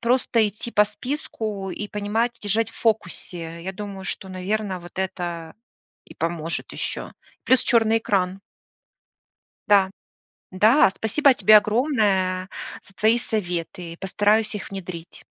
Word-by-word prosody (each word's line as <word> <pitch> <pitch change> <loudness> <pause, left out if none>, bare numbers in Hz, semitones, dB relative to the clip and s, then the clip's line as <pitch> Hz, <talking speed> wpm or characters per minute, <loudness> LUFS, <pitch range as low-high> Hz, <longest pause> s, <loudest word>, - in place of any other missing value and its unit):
просто 235 -2 +2
идти 215 +3 -6
по 210 - +5
списку 215 -4 -4
и 210 - -4
понимать, 220 +4 -1
держать 220 +2 0
в - - -19
фокусе. 170 -7 -2
Я 190 +2 -4
думаю, 195 -1 -7
что, 190 - -4
наверно, 190 0 -2
вот 175 +2 -12
это 175 -3 -4 0.5
и - - -14
поможет 165 0 -3
ещё. - - -4 0.3
Плюс 260 - +5
чёрный 225 -2 +3
экран. 190 -3 0 1.3
Да, 200 -2 +5 0.6
да, 215 +9 +5
спасибо 270 +5 +3
тебе 215 -3 +7
огромное 205 -6 +1 0.4
за 195 - -17
твои 220 +4 +3
советы, 175 -6 -3
постараюсь 210 +3 +2
их 205 - -6
внедрить. 180 -3 -8
205 Hz, 125 wpm, -23 LUFS, 185-220 Hz, 1.3 s, тебе